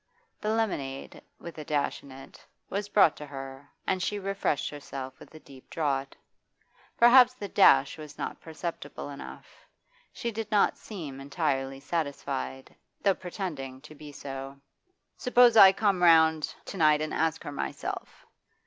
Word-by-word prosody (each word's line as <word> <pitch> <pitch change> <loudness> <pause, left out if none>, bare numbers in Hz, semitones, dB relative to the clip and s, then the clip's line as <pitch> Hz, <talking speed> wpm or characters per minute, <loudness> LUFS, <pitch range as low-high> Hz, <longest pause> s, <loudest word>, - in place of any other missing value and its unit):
The 210 - -2
lemonade 185 -12 -2 0.2
with 170 -2 -10
a - - -5
dash 145 -1 -1
in 140 - -14
it 135 +1 -13 0.3
was 200 +1 -3
brought 200 -7 +5
to 150 - -8
her, 135 0 -9 0.2
and 185 -1 0
she 205 +2 -1
refreshed 195 -6 -1
herself 135 -2 -8
with - - -14
a - - -10
deep 135 -3 -16
draught. 140 -4 -2 0.8
Perhaps 250 +1 +7
the 205 -5 -6
dash 195 -4 +5
was 150 -1 -10
not - - -5
perceptible 160 -3 -6
enough; 140 - -11 0.4
she 235 - -4
did 220 -1 -5
not 210 -2 +3
seem 155 -11 -8
entirely 135 -1 -2
satisfied, 140 - -4 0.3
though 195 - +4
pretending 165 -9 -6
to 150 +1 -13
be 150 0 -11
so. 135 -1 -8 0.6
'Suppose 245 -2 +5
I 195 -3 +10
come 195 -2 +1
round 160 -2 +4
to 195 - -7
night 155 -3 +4
and 155 - -3
ask 160 -1 0
her - - -6
myself? 145 - -5
155 Hz, 150 wpm, -28 LUFS, 140-195 Hz, 0.8 s, I